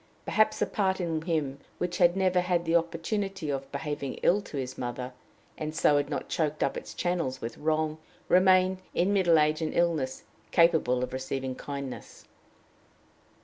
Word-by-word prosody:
Perhaps 215 Hz, 0 st, +2 dB
the -, -, +1 dB
part 190 Hz, -2 st, 0 dB
in 165 Hz, -3 st, -1 dB
him 155 Hz, -5 st, -1 dB, 0.2 s
which 180 Hz, 0 st, -2 dB
had 175 Hz, 0 st, +5 dB
never 185 Hz, -1 st, +3 dB
had 180 Hz, -1 st, 0 dB
the 165 Hz, +1 st, +1 dB
opportunity 170 Hz, +1 st, -1 dB
of 135 Hz, -1 st, -4 dB
behaving 140 Hz, -1 st, -4 dB
ill 200 Hz, +4 st, +4 dB
to 155 Hz, -, -8 dB
his 130 Hz, -1 st, -4 dB
mother, 125 Hz, +1 st, -5 dB, 0.5 s
and 155 Hz, 0 st, -4 dB
so 150 Hz, -2 st, +4 dB
had 145 Hz, -, 0 dB
not -, -, -3 dB
choked 155 Hz, -3 st, -1 dB
up -, -, 0 dB
its -, -, -7 dB
channels 170 Hz, -7 st, -1 dB
with 115 Hz, -, -5 dB
wrong, 155 Hz, 0 st, 0 dB, 0.3 s
remained, 185 Hz, 0 st, +4 dB, 0.2 s
in 185 Hz, +4 st, +2 dB
middle 175 Hz, -5 st, +4 dB
age 155 Hz, +1 st, +2 dB
and 155 Hz, -, -2 dB
illness, 155 Hz, -7 st, 0 dB, 0.3 s
capable 160 Hz, -7 st, +3 dB
of 125 Hz, -, -4 dB
receiving 130 Hz, 0 st, -3 dB
kindness. 140 Hz, -1 st, -7 dB
160 Hz, 165 wpm, -28 LUFS, 140-180 Hz, 0.5 s, had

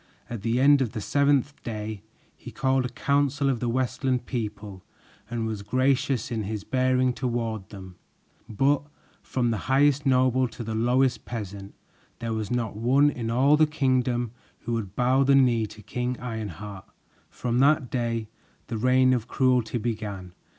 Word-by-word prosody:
At 115 Hz, -4 st, -4 dB
the 115 Hz, +3 st, 0 dB
end 140 Hz, +1 st, +6 dB
of 120 Hz, -3 st, -1 dB
the 110 Hz, -, -3 dB
seventh 140 Hz, +4 st, +1 dB
day, 110 Hz, -2 st, -5 dB, 0.3 s
he -, -, -11 dB
called 130 Hz, -1 st, 0 dB
a -, -, -2 dB
council 140 Hz, +2 st, +1 dB
of 125 Hz, -, -2 dB
the 120 Hz, -, -1 dB
Westland 125 Hz, +1 st, -1 dB
people 105 Hz, -5 st, -5 dB, 0.5 s
and 115 Hz, -1 st, -2 dB
was 110 Hz, -2 st, -3 dB
gracious 130 Hz, +4 st, 0 dB
in 115 Hz, -2 st, -1 dB
his 105 Hz, 0 st, -4 dB
bearing 130 Hz, -1 st, +1 dB
toward 115 Hz, -5 st, -3 dB
them; 95 Hz, -3 st, -11 dB, 0.5 s
but 135 Hz, +6 st, +2 dB, 0.4 s
from 120 Hz, -2 st, -1 dB
the 110 Hz, -, -1 dB
highest 140 Hz, +1 st, +4 dB
noble 130 Hz, 0 st, +3 dB
to 115 Hz, +1 st, -8 dB
the 110 Hz, 0 st, -4 dB
lowest 125 Hz, +3 st, +1 dB
peasant, 100 Hz, -4 st, -7 dB, 0.4 s
there 115 Hz, -1 st, -3 dB
was 110 Hz, -2 st, -3 dB
not 120 Hz, -4 st, -2 dB
one 135 Hz, +7 st, +3 dB
in 115 Hz, -4 st, -4 dB
all 135 Hz, +5 st, +4 dB
the 155 Hz, 0 st, +4 dB
kingdom 130 Hz, -5 st, 0 dB, 0.3 s
who 120 Hz, -, -3 dB
would 105 Hz, -4 st, -3 dB
bow 130 Hz, +2 st, +3 dB
the 135 Hz, 0 st, +4 dB
knee 120 Hz, -5 st, +3 dB
to 105 Hz, +1 st, -13 dB
King 125 Hz, +4 st, -3 dB
Ironheart. 105 Hz, -5 st, -6 dB, 0.4 s
From 120 Hz, 0 st, -2 dB
that 140 Hz, -1 st, +3 dB
day, 115 Hz, -3 st, -1 dB, 0.4 s
the 115 Hz, -2 st, -3 dB
reign 130 Hz, +2 st, +4 dB
of 120 Hz, -2 st, -1 dB
cruelty 125 Hz, -2 st, +1 dB
began. 105 Hz, -6 st, -4 dB
120 Hz, 165 wpm, -26 LUFS, 110-130 Hz, 0.5 s, end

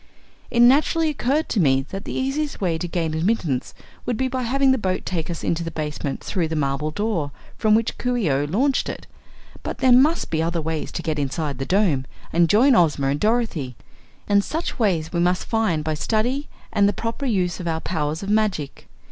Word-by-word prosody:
It 235 Hz, -, +2 dB
naturally 305 Hz, +6 st, +4 dB
occurred 295 Hz, +2 st, 0 dB
to 215 Hz, -, 0 dB
me 135 Hz, -5 st, +3 dB
that 195 Hz, +2 st, -6 dB
the -, -, -5 dB
easiest 280 Hz, +3 st, -2 dB
way 170 Hz, -4 st, 0 dB
to 175 Hz, -, -3 dB
gain 165 Hz, -2 st, -2 dB
admittance 160 Hz, -, -1 dB, 0.3 s
would 245 Hz, -, -2 dB
be 260 Hz, -, 0 dB
by 260 Hz, 0 st, -2 dB
having 265 Hz, +3 st, +2 dB
the 260 Hz, -, +2 dB
boat 185 Hz, -3 st, -2 dB
take 165 Hz, -3 st, -3 dB
us 170 Hz, -, -5 dB
into 170 Hz, 0 st, 0 dB
the 165 Hz, -, -3 dB
basement 150 Hz, -3 st, -4 dB
through 180 Hz, -5 st, -1 dB
the 160 Hz, -, -3 dB
marble 145 Hz, 0 st, -1 dB
door 180 Hz, -4 st, -1 dB, 0.3 s
from 215 Hz, -1 st, +3 dB
which 225 Hz, 0 st, 0 dB
Coo 250 Hz, 0 st, 0 dB
ee 225 Hz, -, 0 dB
oh 135 Hz, +2 st, +1 dB
launched 255 Hz, -, +1 dB
it. -, -, -6 dB, 0.6 s
But -, -, -5 dB
there 260 Hz, -1 st, +3 dB
must 285 Hz, +7 st, +4 dB
be 160 Hz, -1 st, +1 dB
other 170 Hz, +1 st, -1 dB
ways 160 Hz, 0 st, -3 dB
to 170 Hz, -, -4 dB
get 155 Hz, -2 st, -1 dB
inside 140 Hz, 0 st, -2 dB
the 135 Hz, -, -3 dB
Dome 180 Hz, -9 st, +2 dB, 0.3 s
and 170 Hz, 0 st, +4 dB
join 255 Hz, +8 st, +5 dB
Ozma 150 Hz, -, +3 dB
and 140 Hz, +1 st, 0 dB
Dorothy, 210 Hz, -, 0 dB, 0.5 s
and 200 Hz, -1 st, +4 dB
such 320 Hz, +3 st, -4 dB
ways 175 Hz, -8 st, 0 dB
we 170 Hz, -, 0 dB
must 180 Hz, +1 st, +1 dB
find 215 Hz, -9 st, 0 dB
by 155 Hz, 0 st, -1 dB
study 235 Hz, -, -1 dB, 0.2 s
and 200 Hz, 0 st, +4 dB
the -, -, -1 dB
proper 230 Hz, +6 st, -3 dB
use 180 Hz, -7 st, 0 dB
of 175 Hz, -, -5 dB
our 160 Hz, -1 st, 0 dB
powers 160 Hz, 0 st, -2 dB
of 195 Hz, -, -4 dB
magic." 205 Hz, -10 st, -1 dB
185 Hz, 210 wpm, -22 LUFS, 155-235 Hz, 0.6 s, join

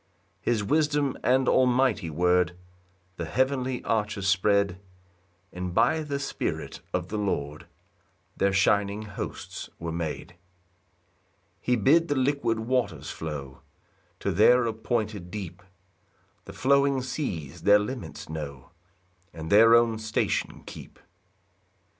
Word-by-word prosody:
3 -, -, +2 dB
His 110 Hz, -3 st, +1 dB
wisdom 145 Hz, +2 st, +1 dB
and 130 Hz, +1 st, +3 dB
almighty 125 Hz, -7 st, +3 dB
word 90 Hz, +2 st, +2 dB, 0.6 s
The 85 Hz, -, -3 dB
heavenly 130 Hz, -, 0 dB
arches 105 Hz, -3 st, -1 dB
spread; 100 Hz, -1 st, +2 dB, 0.7 s
And 90 Hz, 0 st, -5 dB
by 160 Hz, -, +3 dB
the 145 Hz, -2 st, -3 dB
Spirit 140 Hz, -1 st, -4 dB
of -, -, -2 dB
the 105 Hz, -, -2 dB
Lord 75 Hz, -7 st, -3 dB, 0.7 s
Their 100 Hz, -, +2 dB
shining 100 Hz, +2 st, +2 dB
hosts 105 Hz, -2 st, -7 dB
were 85 Hz, 0 st, -5 dB
made. 85 Hz, +1 st, -4 dB
4 90 Hz, -, -23 dB, 1.2 s
He 125 Hz, -, +2 dB
bid 150 Hz, +10 st, +4 dB
the 145 Hz, -, 0 dB
liquid 130 Hz, -4 st, +1 dB
waters 110 Hz, -, -1 dB
flow 70 Hz, -4 st, -6 dB, 0.6 s
To -, -, 0 dB
their 120 Hz, +6 st, +5 dB
appointed 110 Hz, -4 st, -2 dB
deep; 95 Hz, -2 st, -7 dB, 0.8 s
The -, -, -9 dB
flowing 140 Hz, -1 st, +2 dB
seas 85 Hz, -, -4 dB
their 100 Hz, 0 st, +6 dB
limits 105 Hz, -, -5 dB
know, 75 Hz, -3 st, -7 dB, 0.6 s
And 80 Hz, 0 st, -7 dB
their 115 Hz, +3 st, +8 dB
own 115 Hz, -2 st, +3 dB
station 110 Hz, 0 st, -1 dB
keep. -, -, -11 dB
105 Hz, 120 wpm, -27 LUFS, 90-130 Hz, 1.2 s, their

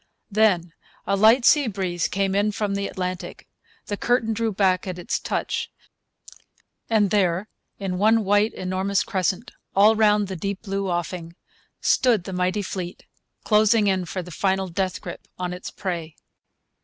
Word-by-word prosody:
Then 190 Hz, -5 st, +2 dB, 0.3 s
a 200 Hz, -, +1 dB
light 225 Hz, +5 st, +5 dB
sea 295 Hz, -4 st, +5 dB
breeze 185 Hz, -5 st, -1 dB
came 195 Hz, 0 st, -1 dB
in 205 Hz, +2 st, +2 dB
from 205 Hz, -1 st, -1 dB
the 200 Hz, 0 st, -1 dB
Atlantic. 185 Hz, 0 st, -5 dB, 0.4 s
The 205 Hz, -, -4 dB
curtain 230 Hz, -1 st, +1 dB
drew 225 Hz, 0 st, -1 dB
back 190 Hz, -2 st, +1 dB
at 180 Hz, -1 st, -4 dB
its 175 Hz, -, -2 dB
touch. -, -, -2 dB, 1.2 s
And 210 Hz, -3 st, +3 dB
there, 190 Hz, -1 st, +1 dB, 0.3 s
in 185 Hz, -2 st, -3 dB
one 220 Hz, +2 st, +4 dB
white, 205 Hz, +2 st, +3 dB
enormous 185 Hz, +1 st, 0 dB
crescent, 190 Hz, +2 st, -1 dB, 0.2 s
all 210 Hz, +3 st, +6 dB
round 210 Hz, -1 st, +3 dB
the 190 Hz, -, -5 dB
deep 195 Hz, +4 st, -4 dB
blue 195 Hz, -2 st, -2 dB
offing, 175 Hz, -1 st, -3 dB, 0.5 s
stood 235 Hz, -8 st, +3 dB
the 190 Hz, -, -6 dB
mighty 185 Hz, +3 st, 0 dB
fleet, 185 Hz, -2 st, -6 dB, 0.4 s
closing 215 Hz, 0 st, +4 dB
in 190 Hz, -2 st, +1 dB
for 185 Hz, +1 st, -4 dB
the 180 Hz, -, -11 dB
final 190 Hz, +2 st, 0 dB
death 185 Hz, +1 st, -2 dB
grip 175 Hz, -, -8 dB
on 180 Hz, -1 st, -3 dB
its 180 Hz, -, -7 dB
prey. 170 Hz, -5 st, -5 dB
195 Hz, 155 wpm, -24 LUFS, 180-210 Hz, 1.2 s, all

